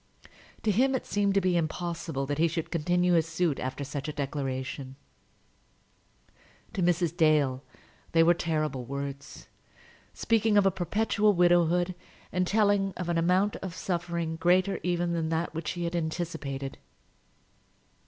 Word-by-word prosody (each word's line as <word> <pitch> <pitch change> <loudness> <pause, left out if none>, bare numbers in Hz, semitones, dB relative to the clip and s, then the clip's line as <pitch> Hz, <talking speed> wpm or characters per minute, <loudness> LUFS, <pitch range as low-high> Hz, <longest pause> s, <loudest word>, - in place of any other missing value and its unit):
To 215 - +2
him 260 +6 +3
it 260 - -3
seemed 200 -1 0
to 195 - +4
be 185 -1 +1
impossible 165 -3 -2
that 145 +2 -3
he 165 - +4
should 165 0 -4
continue 175 +2 +2
his 165 -1 +3
suit 165 -2 0
after 130 +2 -4
such 140 0 -5
a - - -2
declaration. 135 -2 -4 1.8
To 190 - -2
Mrs. 175 -1 +1
Dale 150 -5 +2 0.5
they 165 0 +5
were 170 +1 +6
terrible 155 -6 -2
words, 140 +2 -6 0.6
speaking 220 -2 +2
of 200 - +5
a 195 - +4
perpetual 210 +3 +1
widowhood, 175 0 +3 0.4
and 180 0 0
telling 205 -2 +2
of 180 -1 -4
an 170 -1 +1
amount 185 +4 +2
of 185 -3 -7
suffering 170 -3 -2
greater 185 +4 +2
even 175 -1 0
than 165 -2 -1
that 165 +1 -1
which 165 +1 -5
she 175 - -3
had 170 +1 -2
anticipated. 160 -5 -4
170 Hz, 145 wpm, -28 LUFS, 155-180 Hz, 1.8 s, were